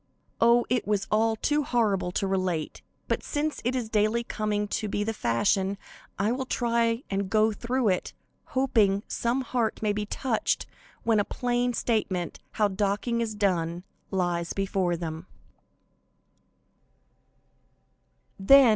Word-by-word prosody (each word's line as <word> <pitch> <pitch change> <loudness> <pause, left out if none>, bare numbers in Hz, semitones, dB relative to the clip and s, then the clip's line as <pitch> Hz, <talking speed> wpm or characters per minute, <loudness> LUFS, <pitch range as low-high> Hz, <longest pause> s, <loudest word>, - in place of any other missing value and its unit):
Oh, 235 +1 +5
it 245 -3 0
was 205 -2 +1
all 220 +1 +3
too 295 +7 +1
horrible 215 -8 +1
to 195 - 0
relate, 185 -5 -1 0.3
but - - 0
since 300 0 -2
it 245 +2 0
is 245 -3 -1
daily 215 +2 +1
coming 210 -2 -1
to 215 0 -1
be 205 0 -1
the 225 +1 -1
fashion, 190 - +1 0.4
I 205 +4 +1
will 260 +1 -2
try 235 0 +1
and 195 -1 -1
go 215 +1 +3
through 240 +2 0
it, 185 - -1 0.5
hoping 215 -7 +3
some 240 +3 0
heart 235 -3 -1
may 210 -1 +2
be 210 0 -3
touched 235 -1 -1 0.4
when 225 -2 +3
a - - +3
plain 245 +2 0
statement 205 -7 -1
how 210 - +3
docking 205 +4 0
is 220 -2 -2
done, 175 -4 0 0.3
lies 175 -3 -1
before 190 -3 0
them. 165 +1 -5
215 Hz, 135 wpm, -27 LUFS, 195-235 Hz, 0.5 s, Oh